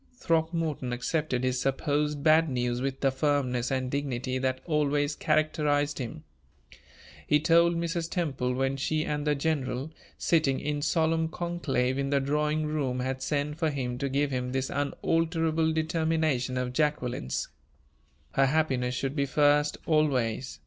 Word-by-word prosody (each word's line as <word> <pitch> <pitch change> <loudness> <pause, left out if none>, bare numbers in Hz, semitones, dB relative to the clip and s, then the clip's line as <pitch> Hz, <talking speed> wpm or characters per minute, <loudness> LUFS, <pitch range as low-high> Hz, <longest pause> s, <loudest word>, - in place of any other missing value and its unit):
Throckmorton 160 - -1
accepted 130 0 -1
his 130 0 0
supposed 145 +2 0
bad 160 0 +5
news 125 -1 -1
with 135 0 -3
the 135 - +3
firmness 130 -3 0
and 130 -1 -1
dignity 130 -2 -2
that 130 0 -1
always 145 -2 +1
characterized 150 -2 +1
him. 150 +5 -6 1.0
He 150 - +4
told 170 +2 +4
Mrs. 170 0 -2
Temple, 135 -9 -1
when 135 +1 0
she 155 +3 0
and 150 0 -2
the 150 - +3
general, 140 -1 -2 0.3
sitting 155 -5 +2
in 145 -1 -2
solemn 160 +1 +1
conclave 145 -7 -1
in 140 0 -1
the 140 0 +2
drawing 150 +2 0
room, 140 -5 -1
had 130 +1 -3
sent 150 +2 -2
for 160 -2 +2
him 125 -4 -3
to 140 - -1
give 140 +1 0
him 125 -1 -2
this 130 0 -1
unalterable 160 +2 0
determination 160 -5 0
of 125 0 -2
Jacqueline's: 125 - -1 0.8
"Her 135 0 +3
happiness 130 -4 +1
should 135 +2 -2
be 140 -2 0
first 145 +2 +3
always. 135 -6 +1
145 Hz, 145 wpm, -28 LUFS, 130-155 Hz, 1.0 s, bad